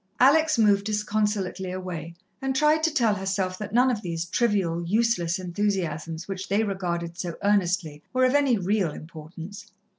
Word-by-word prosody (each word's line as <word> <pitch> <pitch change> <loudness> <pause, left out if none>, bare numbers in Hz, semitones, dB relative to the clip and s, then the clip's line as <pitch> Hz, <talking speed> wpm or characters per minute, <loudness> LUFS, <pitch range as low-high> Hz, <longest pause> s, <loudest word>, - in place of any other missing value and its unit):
Alex 310 +3 +5
moved 205 -3 +4
disconsolately 210 -3 -1
away, 175 -3 -6 0.3
and 265 0 -1
tried 300 +3 +3
to 325 +1 +2
tell 235 -8 +2
herself 190 -1 -2
that 210 -1 -5
none 250 +3 +4
of 220 -4 -2
these 170 -3 -3
trivial, 185 -4 0
useless 190 -2 +1
enthusiasms 175 -3 -2
which 195 -1 -5
they 205 +3 +2
regarded 175 -4 -3
so 170 -2 -3
earnestly 180 -6 +1
were 255 0 +3
of 255 - +2
any 280 -5 +3
real 195 -1 +1
importance. 165 +6 -10
195 Hz, 155 wpm, -26 LUFS, 175-220 Hz, 0.3 s, Alex